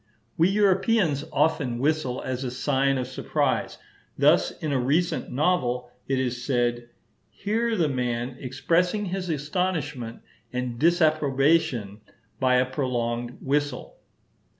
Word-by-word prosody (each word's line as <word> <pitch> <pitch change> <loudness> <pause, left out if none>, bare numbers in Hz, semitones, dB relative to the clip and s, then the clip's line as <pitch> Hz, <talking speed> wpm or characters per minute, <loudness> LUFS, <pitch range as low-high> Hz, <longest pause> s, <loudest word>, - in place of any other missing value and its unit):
We 165 +3 +4
Europeans 195 -6 +2
often 145 -5 +1
whistle 135 -1 0
as 130 0 -3
a 130 - -2
sign 135 +1 +1
of 130 - -1
surprise; 130 +1 -1 0.4
thus, - - +4
in 155 - -5
a 135 - +1
recent 150 +8 0
novel 125 -5 0 0.2
it 135 - 0
is 125 -1 -2
said, 120 -2 0 0.4
"here 225 +3 -1
the 165 -4 +2
man 125 -2 -2
expressed 165 +7 +1
his 190 -3 -3
astonishment 150 -6 -2 0.3
and 125 -2 -3
disapprobation 150 - +2 0.4
by 130 -1 +3
a 125 +1 +4
prolonged 120 -2 -2
whistle." 145 -1 -2
135 Hz, 120 wpm, -25 LUFS, 125-165 Hz, 0.4 s, We